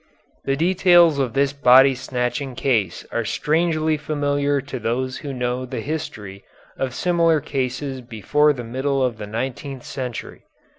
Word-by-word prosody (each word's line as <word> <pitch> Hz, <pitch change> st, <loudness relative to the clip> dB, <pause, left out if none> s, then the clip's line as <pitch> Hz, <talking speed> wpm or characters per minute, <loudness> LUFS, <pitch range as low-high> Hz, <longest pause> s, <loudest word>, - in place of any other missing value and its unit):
The 135 Hz, -, +1 dB
details 175 Hz, -1 st, +4 dB
of 130 Hz, -4 st, -1 dB
this 140 Hz, 0 st, +2 dB
body 135 Hz, -1 st, +6 dB
snatching 130 Hz, +1 st, -3 dB
case 115 Hz, -9 st, 0 dB
are -, -, -1 dB
strangely 155 Hz, 0 st, 0 dB
familiar 145 Hz, -1 st, 0 dB
to 135 Hz, -1 st, -6 dB
those 130 Hz, +3 st, -2 dB
who 145 Hz, -, -6 dB
know 125 Hz, 0 st, -2 dB
the 125 Hz, -1 st, -5 dB
history 110 Hz, -9 st, -6 dB, 0.3 s
of 130 Hz, -2 st, -3 dB
similar 170 Hz, -3 st, +2 dB
cases 135 Hz, -1 st, -3 dB
before 125 Hz, +6 st, +1 dB
the 125 Hz, -4 st, -5 dB
middle 135 Hz, +3 st, -1 dB
of 120 Hz, -4 st, -1 dB
the 105 Hz, -, -6 dB
nineteenth 130 Hz, +4 st, -5 dB
century. 125 Hz, -3 st, -6 dB
135 Hz, 145 wpm, -22 LUFS, 125-145 Hz, 0.3 s, body